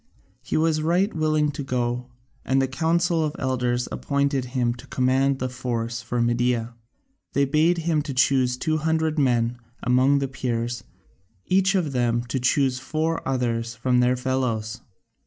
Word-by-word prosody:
He -, -, -2 dB
was 155 Hz, -1 st, +2 dB
right 180 Hz, +6 st, +1 dB
willing 155 Hz, -2 st, +1 dB
to 145 Hz, -, -6 dB
go, 125 Hz, -2 st, -2 dB, 0.4 s
and 135 Hz, 0 st, +1 dB
the 135 Hz, -, +2 dB
Council 165 Hz, +4 st, +1 dB
of 150 Hz, -1 st, -2 dB
Elders 125 Hz, -2 st, -1 dB
appointed 140 Hz, -2 st, 0 dB
him 125 Hz, -2 st, 0 dB
to 120 Hz, +3 st, -13 dB
command 130 Hz, +2 st, +1 dB
the 130 Hz, -, -2 dB
force 120 Hz, -2 st, -3 dB
for 120 Hz, +1 st, -3 dB
Media. 120 Hz, 0 st, +1 dB, 0.6 s
They 140 Hz, -, +3 dB
bade 155 Hz, +5 st, +2 dB
him 165 Hz, -2 st, 0 dB
choose 130 Hz, -2 st, +2 dB
two 155 Hz, +4 st, 0 dB
hundred 160 Hz, 0 st, 0 dB
men 120 Hz, -3 st, +1 dB, 0.2 s
among 130 Hz, +3 st, +4 dB
the 140 Hz, -1 st, 0 dB
Peers, 120 Hz, -2 st, -3 dB, 0.6 s
each 190 Hz, +1 st, +2 dB
of 170 Hz, -6 st, 0 dB
them 120 Hz, -2 st, +1 dB
to 130 Hz, -, -1 dB
choose 130 Hz, 0 st, +2 dB
four 160 Hz, +4 st, -1 dB
others 115 Hz, -3 st, -1 dB
from 125 Hz, +2 st, +1 dB
their 125 Hz, +1 st, +3 dB
fellows. 125 Hz, -4 st, -2 dB
130 Hz, 155 wpm, -24 LUFS, 120-155 Hz, 0.6 s, among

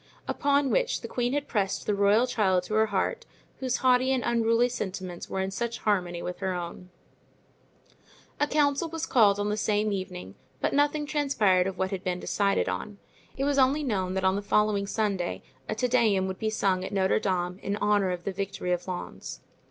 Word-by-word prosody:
Upon 280 Hz, -1 st, +1 dB
which -, -, +1 dB
the -, -, -6 dB
queen 245 Hz, +1 st, -1 dB
had 290 Hz, 0 st, -1 dB
pressed 200 Hz, -5 st, -1 dB
the 210 Hz, -, +1 dB
royal 205 Hz, +4 st, +4 dB
child 190 Hz, -7 st, +1 dB
to 215 Hz, -, -6 dB
her 220 Hz, 0 st, +3 dB
heart, 195 Hz, -3 st, -1 dB, 0.3 s
whose 255 Hz, -2 st, 0 dB
haughty 255 Hz, +1 st, +4 dB
and 260 Hz, -2 st, +1 dB
unruly 230 Hz, 0 st, +3 dB
sentiments 190 Hz, -6 st, -5 dB
were 190 Hz, -, -2 dB
in 190 Hz, 0 st, -2 dB
such 235 Hz, +4 st, -3 dB
harmony 180 Hz, -5 st, -1 dB
with 180 Hz, -, -5 dB
her 190 Hz, -1 st, -1 dB
own. 175 Hz, +1 st, -6 dB, 1.5 s
A 295 Hz, -, +2 dB
council 295 Hz, +2 st, +1 dB
was 325 Hz, 0 st, -3 dB
called 205 Hz, -5 st, +4 dB
on 205 Hz, 0 st, 0 dB
the 210 Hz, -, -1 dB
same 210 Hz, 0 st, +1 dB
evening, 185 Hz, -, -5 dB, 0.3 s
but -, -, 0 dB
nothing 290 Hz, +1 st, +2 dB
transpired 225 Hz, -12 st, +2 dB
of 190 Hz, -1 st, -4 dB
what 190 Hz, +2 st, -1 dB
had 190 Hz, -2 st, -4 dB
been 180 Hz, -1 st, -2 dB
decided 200 Hz, +1 st, +1 dB
on. 210 Hz, -1 st, -4 dB, 0.4 s
It 270 Hz, -, -1 dB
was 280 Hz, 0 st, +2 dB
only 275 Hz, +3 st, +3 dB
known 190 Hz, -7 st, -1 dB
that 190 Hz, -, -1 dB
on 190 Hz, 0 st, +3 dB
the 200 Hz, -, -1 dB
following 205 Hz, -1 st, +1 dB
Sunday 200 Hz, -5 st, -1 dB, 0.3 s
a 215 Hz, -, -1 dB
Te 250 Hz, +3 st, 0 dB
Deum 225 Hz, -6 st, +3 dB
would 190 Hz, 0 st, -5 dB
be 220 Hz, -, 0 dB
sung 195 Hz, -4 st, 0 dB
at -, -, -5 dB
Notre 190 Hz, 0 st, +2 dB
Dame 180 Hz, -2 st, -1 dB
in 200 Hz, +1 st, -2 dB
honor 205 Hz, -2 st, +2 dB
of 180 Hz, -1 st, -3 dB
the 200 Hz, -, -2 dB
victory 195 Hz, -1 st, -3 dB
of 180 Hz, +1 st, -1 dB
Lens. 180 Hz, -1 st, -6 dB
205 Hz, 200 wpm, -27 LUFS, 190-245 Hz, 1.5 s, royal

